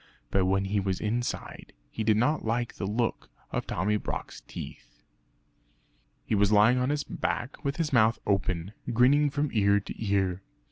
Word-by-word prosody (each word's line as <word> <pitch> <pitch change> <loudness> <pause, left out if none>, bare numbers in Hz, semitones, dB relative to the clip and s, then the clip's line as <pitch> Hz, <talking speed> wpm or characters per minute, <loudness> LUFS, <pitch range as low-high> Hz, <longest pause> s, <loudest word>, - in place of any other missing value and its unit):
But 95 -1 +2
when 95 +1 +2
he 100 +1 0
was 95 -2 -1
inside 120 +3 -3 0.2
he 110 - -3
did 110 -1 +3
not 145 +8 +1
like 120 +1 -1
the 95 - -4
look 115 +3 -1 0.2
of - - -3
Tommy 105 +4 0
Brock's - - -5
teeth. - - -10 1.2
He - - -2
was 100 0 +3
lying 110 +4 +5
on 125 +1 +1
his 145 0 0
back 120 +3 -3
with 140 0 -1
his 160 -4 -1
mouth 115 -1 +4
open, 95 -1 0 0.2
grinning 135 +5 +4
from 145 +1 -1
ear 100 -2 +4
to 100 - -7
ear. 95 -3 0
110 Hz, 170 wpm, -28 LUFS, 100-125 Hz, 1.2 s, lying